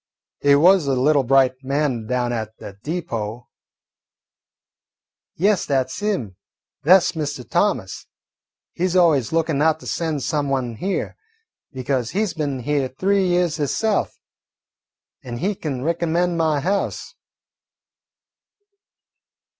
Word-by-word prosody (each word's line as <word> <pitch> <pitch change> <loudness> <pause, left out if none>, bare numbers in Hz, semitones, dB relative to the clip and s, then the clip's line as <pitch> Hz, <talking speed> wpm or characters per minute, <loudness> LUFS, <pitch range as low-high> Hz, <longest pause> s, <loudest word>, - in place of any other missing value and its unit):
"He 140 0 +5
was 175 +1 +5
a 135 - +2
little 140 +3 +3
bright 130 0 +2
man 135 -5 -1
down 125 0 0
at 110 -1 -5
de 100 - -9
deepo." 120 -8 -4 1.9
"Yes, 195 +2 +1
that 130 -2 0
's - - -6
him. 185 - -2 0.4
That 180 +3 +6
's - - 0
Mr. 145 -6 -4
Thomas. - - -1 0.7
He 180 - 0
's 185 - -3
always 160 -10 +3
lookin' 160 -3 0
out 160 0 +3
to - - -12
send 160 -5 -2
some 145 +2 -1
one 125 -4 -2
here, 195 - -3 0.5
because 130 -2 -2
he 210 +3 0
's 185 - -4
been 145 -5 -3
here 140 0 0
three 190 +8 +1
years 175 -2 +1
hisself 200 +8 -1 1.0
an' 120 -1 -6
he 195 +10 -1
kin 140 -9 -4
recommend 170 +2 0
my 160 -3 +1
house." 195 +6 -2
145 Hz, 130 wpm, -21 LUFS, 130-175 Hz, 1.9 s, That